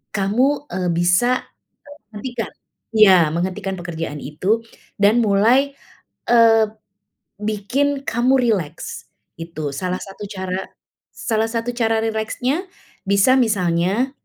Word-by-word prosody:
kamu, 255 +9 +1
eee, 180 -1 -1
bisa 180 +9 +2 0.7
menghentikan 230 +2 -5 0.5
iya, 190 -6 +7
menghentikan 190 +3 -2
pekerjaan 165 -4 -5
itu 190 +11 0 0.4
dan 205 +4 +4
mulai, 235 +7 +3 0.5
eee, 225 -2 +6 0.7
bikin 250 +7 -1
kamu 245 +3 +2
rileks, 210 -11 -2 0.3
itu. 160 -3 -5
Salah 180 +4 -2
satu 200 +1 -8
cara 190 -2 -4 0.5
salah 225 -1 -1
satu 230 +1 -2
cara 225 -2 +1
rileksnya 245 - -2 0.4
bisa 200 +6 +4
misalnya, 200 +2 +1
215 Hz, 100 wpm, -20 LUFS, 185-240 Hz, 0.7 s, iya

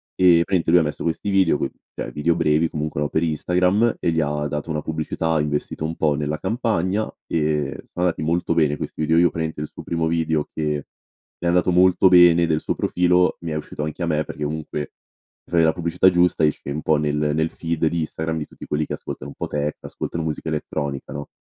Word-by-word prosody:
e 90 -2 +5
praticamente 90 -3 0
lui 90 - +7
ha - - +2
messo 75 -1 -4
questi 85 +5 -2
video, 95 -6 +3
coi - - -2 0.2
cioè, - - -5
video 80 +3 +1
brevi, 80 +1 +2
comunque, 75 -1 -3
no, 75 - +1
per 80 - 0
Instagram, 90 +8 +2
e 85 - +1
gli 80 - 0
ha 75 -1 -1
dato 75 +3 -4
una 75 -1 -1
pubblicità, 80 +1 -2
ha 80 - +2
investito 75 +1 -2
un 80 +1 -3
po' 75 -3 +1
nella 75 +1 -2
campagna, 110 -3 0 0.2
e 75 -3 0 0.2
sono 90 0 -3
andati 85 - 0
molto 85 +1 0
bene 75 -3 +3
questi 75 - -6
video. 80 +2 +2
Io 85 0 +5
praticamente, 80 -2 -4
il 75 - -3
suo - - -11
primo 85 -1 -1
video, 80 -2 0
che 75 -2 -2 0.5
è - - -7
andato 90 +1 +3
molto 90 +1 +5
bene 85 -2 +6
del 80 -1 +1
suo - - -1
profilo, 90 0 +2
mi 85 -1 -4
è 75 - -2
uscito 75 -1 -5
anche 80 +4 -5
a - - -1
me, 75 -1 +1
perché 75 - -6
comunque 75 0 -3 0.7
mi - - -16
fai 85 -1 +5
la 80 - +5
pubblicità 85 +2 +3
giusta, 90 -2 +2
esce 75 -2 -2
un 75 +2 -3
po' 80 - +2
nel 75 0 0 0.2
nel 80 +1 +1
feed 85 -1 -2
di 85 +1 0
Instagram, 80 +1 -3
di 75 - -4
tutti - - -12
quelli 75 +1 0
che - - -5
ascoltano 65 - -7
un - - -13
po' - - -3
techno, 75 0 -2
ascoltano 85 - -5
musica 80 0 -3
elettronica, 70 -3 -4
no. 70 +1 -6
80 Hz, 225 wpm, -22 LUFS, 75-85 Hz, 0.7 s, lui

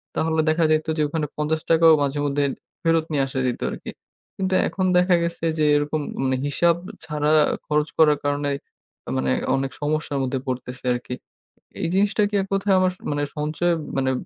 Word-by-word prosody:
তাহলে 160 0 0
দেখা 160 +1 +2
যাইত 155 +1 +1
যে, - - +1
ওখানে 155 +1 -2
৳৫০ 160 +2 +1
ও - - +8
মাঝেমধ্যে 145 0 0 0.4
ফেরত 165 -1 +2
নিয়ে 145 -3 +2
আসা 130 0 -3
যেত 125 - -3
আরকি। - - -7 0.5
কিন্তু 190 -1 -1
এখন 190 - -2
দেখা 180 0 +4
গেছে 170 0 -3
যে, 155 - +3
এরকম 145 +1 0 0.2
মানে 130 0 +1
হিসাব 170 +4 +2 0.3
ছাড়া 150 -1 0 0.4
খরচ 150 0 +1
করার 150 -2 +5
কারণে, 145 0 0 0.7
মানে 65 0 0 0.2
অনেক 135 0 -2
সমস্যার 150 -1 -1
মধ্যে 130 0 -1
পড়তেছি 125 -1 -5
আরকি। 125 +1 -4 0.7
এই - - 0
জিনিসটা 205 +2 +2
কি - - -1 0.2
কোথায় 195 0 +2
আমার 185 0 +3 0.2
মানে 145 0 -1
সঞ্চয় 155 +4 0 0.2
মানে 130 -1 +1
150 Hz, 165 wpm, -23 LUFS, 145-165 Hz, 0.7 s, ও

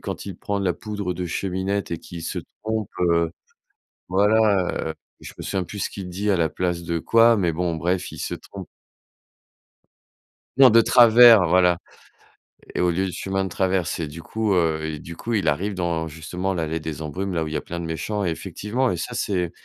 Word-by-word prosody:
quand - - -6
il - - -6
prend 100 -1 -3
de - - -2
la 90 - +1
poudre 105 -4 -4
de 90 +1 -4
cheminette 95 +3 -2
et 85 - -2
qu'il 85 +1 -9
se - - -3 0.2
trompe, 110 -2 -2
heu. 85 -2 +2 0.8
Voilà, 100 -3 +2
heu, 80 - -5 0.3
je - - -9
me - - -6
souviens 95 -1 -2
plus 100 +3 -8
ce - - -2
qu'il 95 -2 -7
dit 100 +3 -1
à 95 - +3
la 85 -2 +2
place 90 -1 -2
de 85 0 -1
quoi. 115 +3 +5
Mais 90 -5 +1
bon, 85 0 -1
bref, 90 +3 -1
il - - -9
se - - -3
trompe. - - -10 1.9
Non, 135 -2 +9
de 115 +1 +7
travers, 115 -4 +7
voilà 90 0 +4 1.0
et - - 0
au 90 - +3
lieu 95 +3 0
de 95 - -3
chemin 95 +2 -2
de - - -3
traverse 95 -1 0
et 80 - -2
du 75 +3 -9
coup, 110 0 -1
heu 80 -3 +1
et 80 -2 -4
du 85 +2 -9
coup, 120 - -5
il 105 - +1
arrive 100 +7 0
dans 85 -3 -1
justement 85 +5 -4
l'allée 80 -2 -2
des 80 -1 -6
embrumes, 95 +5 -4
là 85 - 0
où 80 - -3
il 75 - -7
y - - +1
a - - -1
plein 85 0 -6
de - - -5
méchants 80 +6 -3
et 85 - +1
effectivement 120 +9 -2
et - - -2
ça, 80 - -5
c'est 90 -4 -1
90 Hz, 215 wpm, -23 LUFS, 85-100 Hz, 1.9 s, Non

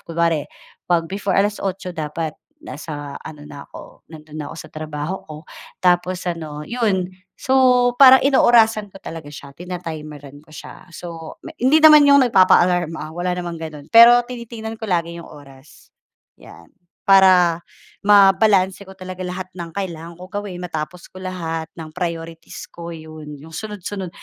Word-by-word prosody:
kunwari, 165 -3 -1 0.4
'pag 170 -2 +2
before 195 0 -2
8:00 195 -2 -1
dapat 155 -1 -4 0.3
nasa 145 - -7
ano 150 -2 -11
na 145 -1 -11
ako, - - -14
nando'n 155 -1 -12
na 145 - -6
ako - - -10
sa - - -11
trabaho 155 +3 -5
ko 155 - -8 0.5
tapos 180 +1 +1
ano 155 -4 -5
'yon. 190 -5 -1 0.2
So 250 -2 +3
parang 265 -1 +8
inoorasan 225 -6 +4
ko 195 - -16
talaga 160 -3 -8
siya, 140 -1 -11
tina-timeran 155 -4 -8
ko 155 - -27
siya, 180 - -12
so 165 -2 -9
m 320 - -8
hindi 305 +5 +4
naman 300 -2 +8
'yong 280 -2 +6
nagpapa-alarm, 175 -4 +3
ah, 155 +1 -7
wala 180 +1 -2
namang 175 -2 -5
gano'n, 155 -1 -9
pero 240 +1 +8
tinitingnan 230 -2 -8
ko 220 - -5
lagi 170 -2 -2
'yong - - -13
oras. 140 -1 -17 0.5
'Yan, - - -15 0.3
para 185 -4 +5 0.4
mabalanse 200 -1 +4
ko 190 - -12
talaga 185 0 -9
lahat 185 +1 -6
ng 170 -3 -8
kailangan 170 -4 -5
ko 180 - -11
gawin 205 -3 -5
matapos 170 +1 -6
ko 185 - -11
lahat, 165 -3 -5
ng 160 -2 -8
priorities 165 -1 -6
ko 170 0 -9
'yon 155 -2 -10
'yong 155 +3 -14
sunod-sunod. 200 0 -6
175 Hz, 155 wpm, -20 LUFS, 160-200 Hz, 0.5 s, parang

